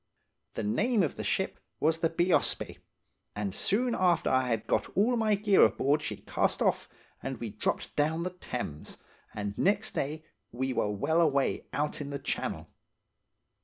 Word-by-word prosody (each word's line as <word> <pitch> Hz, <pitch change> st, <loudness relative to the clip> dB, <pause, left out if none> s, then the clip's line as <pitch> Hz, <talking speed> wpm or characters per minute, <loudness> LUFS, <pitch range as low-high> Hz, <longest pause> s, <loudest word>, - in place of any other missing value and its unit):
"The -, -, -2 dB
name 210 Hz, -, +2 dB
of 155 Hz, -, -1 dB
the -, -, -5 dB
ship -, -, -1 dB, 0.2 s
was 160 Hz, +2 st, +2 dB
the 165 Hz, -, +2 dB
Bheospsé, 175 Hz, +2 st, +1 dB, 0.6 s
and 100 Hz, -2 st, -2 dB
soon 235 Hz, -, +1 dB
after 180 Hz, -4 st, +2 dB
I 130 Hz, 0 st, +3 dB
had 115 Hz, -2 st, -1 dB
got -, -, 0 dB
all 230 Hz, +5 st, +4 dB
my 220 Hz, -2 st, +3 dB
gear 200 Hz, -1 st, +5 dB
aboard 145 Hz, +3 st, +3 dB
she -, -, -4 dB
cast -, -, 0 dB
off, -, -, +1 dB, 0.3 s
and 135 Hz, -2 st, -4 dB
we 115 Hz, -3 st, -4 dB
dropped -, -, -2 dB
down 160 Hz, +3 st, +1 dB
the 180 Hz, -, -2 dB
Thames, 125 Hz, -, -6 dB, 0.4 s
and 100 Hz, -1 st, -3 dB
next 205 Hz, +2 st, +2 dB
day 155 Hz, +3 st, -3 dB, 0.3 s
were 125 Hz, -3 st, -1 dB
well 160 Hz, +12 st, +1 dB
away 140 Hz, -4 st, +1 dB
out 150 Hz, +1 st, -1 dB
in 140 Hz, -, -5 dB
the 140 Hz, -, -3 dB
Channel. 135 Hz, -, -3 dB
155 Hz, 165 wpm, -30 LUFS, 130-185 Hz, 0.6 s, gear